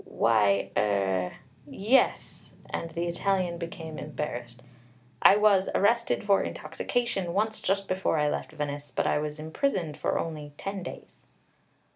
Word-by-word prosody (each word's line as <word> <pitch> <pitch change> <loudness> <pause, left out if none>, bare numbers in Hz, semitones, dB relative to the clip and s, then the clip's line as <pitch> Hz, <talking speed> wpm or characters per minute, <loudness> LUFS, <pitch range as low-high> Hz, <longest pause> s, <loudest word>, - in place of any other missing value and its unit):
"Why, 100 -3 +2
er, 95 -3 +1 0.3
yes," 230 +7 +1 0.2
and 165 - -3
the 170 +1 -3
Italian 175 0 0
became 165 -2 -6
embarrassed. 125 -5 -5 0.6
"I - - +8
was 205 -2 +4
arrested 235 +4 +2
for 200 -1 +4
intoxication 195 -8 -2
once 215 +2 0
just 195 +1 0
before 185 -3 0
I 150 -1 +2
left 145 - -2
Venice; 145 -1 -4
but - - -1
I - - +2
was 150 0 -4
imprisoned 160 - -2
for - - 0
only 150 -3 -4
ten 195 0 -4
days." 175 - -9
165 Hz, 135 wpm, -28 LUFS, 145-195 Hz, 0.6 s, I